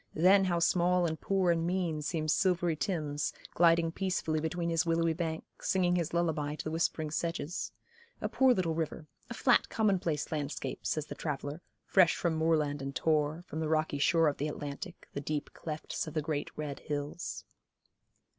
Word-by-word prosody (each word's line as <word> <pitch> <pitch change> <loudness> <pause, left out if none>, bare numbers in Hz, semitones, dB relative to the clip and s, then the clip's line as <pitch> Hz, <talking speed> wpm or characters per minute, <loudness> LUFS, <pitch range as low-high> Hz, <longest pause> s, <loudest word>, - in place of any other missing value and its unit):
Then 190 +4 +6
how 175 -2 +1
small 175 +1 +3
and 160 -1 -2
poor 190 -3 +2
and 165 -1 +1
mean 170 -3 0
seems 155 0 0
silvery 175 -3 +2
Thames, 150 -4 -2 0.2
gliding 165 -1 +4
peacefully 170 -4 -1
between 170 +2 -2
his 165 -1 +2
willowy 165 0 +2
bank, 160 -1 -3 0.2
singing 180 -2 +2
his 170 -3 0
lullaby 155 -4 0
to - - -6
the 155 - -3
whispering 160 -1 0
sedges; 170 +1 -2 0.5
a - - -1
poor 265 -1 +4
little 180 -8 +1
river, 160 -1 -3 0.2
a 235 - -5
flat 250 0 +3
commonplace 185 -8 0
landscape, 150 -2 -3
says 155 -1 -1
the - - -7
traveller, 145 +1 -4 0.2
fresh 185 -4 +5
from 170 -2 0
moorland 155 -3 +1
and 135 0 -5
tor, 155 +1 +1
from 155 - -5
the 160 -1 -1
rocky 155 -2 +1
shore 165 +2 +4
of 145 - 0
the 145 - -1
Atlantic, 145 -1 -6
the 140 - -3
deep 150 +1 -3
clefts 155 0 -4
of 155 - -7
the 155 - +1
great, 145 -1 -2
red 150 -2 -4
hills. 145 +3 -4
160 Hz, 175 wpm, -31 LUFS, 150-175 Hz, 0.5 s, Then